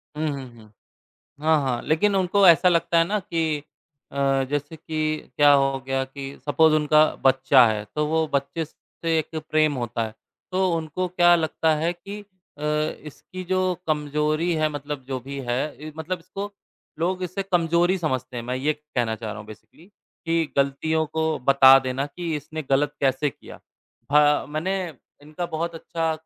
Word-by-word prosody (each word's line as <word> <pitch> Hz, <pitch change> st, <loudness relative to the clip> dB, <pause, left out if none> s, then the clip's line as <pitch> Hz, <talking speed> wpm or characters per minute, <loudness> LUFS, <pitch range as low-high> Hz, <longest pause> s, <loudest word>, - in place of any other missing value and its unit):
हुँ, 155 Hz, +1 st, -1 dB
हुँ, 140 Hz, -2 st, -5 dB
हुँ। 105 Hz, -1 st, -17 dB, 0.7 s
हाँ, 160 Hz, +1 st, +3 dB
हाँ, 125 Hz, -3 st, -1 dB
लेकिन 195 Hz, +6 st, +2 dB
उनको 190 Hz, +1 st, +3 dB
ऐसा 170 Hz, +2 st, +6 dB
लगता 170 Hz, -1 st, +2 dB
है 165 Hz, -, +5 dB
ना 205 Hz, +5 st, -1 dB
कि 160 Hz, -4 st, -1 dB, 0.5 s
अ, 135 Hz, -1 st, +1 dB
जैसे 145 Hz, +2 st, -3 dB
कि 155 Hz, -1 st, -3 dB
क्या 145 Hz, 0 st, +6 dB
हो 135 Hz, -1 st, +3 dB
गया 135 Hz, 0 st, 0 dB
कि 135 Hz, +1 st, -9 dB, 0.2 s
सपोज 160 Hz, +2 st, +4 dB
उनका 155 Hz, 0 st, +5 dB, 0.2 s
बच्चा 130 Hz, 0 st, +6 dB
है, 105 Hz, -1 st, -1 dB
तो 150 Hz, 0 st, 0 dB
वो 160 Hz, +1 st, +1 dB
बच्चे 140 Hz, +4 st, -1 dB
से 165 Hz, +1 st, -4 dB
एक 160 Hz, +1 st, -4 dB
प्रेम 155 Hz, -1 st, +3 dB
होता 120 Hz, -2 st, -3 dB
है, 110 Hz, -, -11 dB, 0.4 s
तो 190 Hz, 0 st, +2 dB
उनको 165 Hz, +3 st, -3 dB
क्या 175 Hz, -1 st, +5 dB
लगता 160 Hz, -1 st, +1 dB
है 165 Hz, +3 st, 0 dB
कि 195 Hz, +4 st, -9 dB, 0.4 s
अ, -, -, -10 dB, 0.5 s
इसकी 185 Hz, +5 st, -10 dB
जो 185 Hz, -, +2 dB, 0.3 s
कमजोरी 150 Hz, +2 st, 0 dB
है 155 Hz, -1 st, +1 dB
मतलब 145 Hz, -2 st, -6 dB
जो 130 Hz, -, -2 dB
भी 140 Hz, +2 st, -7 dB
है 120 Hz, +2 st, +1 dB, 0.3 s
इ -, -, -7 dB
मतलब 165 Hz, +3 st, -3 dB
इसको 195 Hz, +4 st, -7 dB, 0.5 s
लोग 185 Hz, +3 st, -1 dB
इसे 185 Hz, +2 st, -3 dB
कमजोरी 175 Hz, -1 st, +2 dB
समझते 130 Hz, -5 st, -3 dB
हैं। 120 Hz, -, -3 dB
मैं 125 Hz, +1 st, -2 dB
ये 145 Hz, +4 st, +1 dB
कहना 140 Hz, -7 st, -3 dB
चाह 110 Hz, -1 st, -6 dB
रहा 110 Hz, -, -7 dB
हूँ 105 Hz, -, -10 dB
बेसिकली 110 Hz, +9 st, -15 dB, 0.4 s
कि 165 Hz, -1 st, 0 dB
गलतियों 140 Hz, +3 st, +1 dB
को 160 Hz, 0 st, 0 dB, 0.2 s
बता 135 Hz, -1 st, +8 dB
देना 130 Hz, +2 st, -1 dB
कि 165 Hz, +2 st, -4 dB
इसने 155 Hz, +1 st, -6 dB
गलत 145 Hz, +2 st, +2 dB
कैसे 135 Hz, +1 st, +1 dB
किया? -, -, -14 dB, 0.5 s
हाँ, 150 Hz, 0 st, +4 dB
मैंने 165 Hz, +6 st, -2 dB, 0.5 s
इनका 155 Hz, +4 st, -5 dB
बहुत 170 Hz, +1 st, -2 dB
अच्छा 165 Hz, 0 st, -2 dB
155 Hz, 175 wpm, -24 LUFS, 135-165 Hz, 0.7 s, बता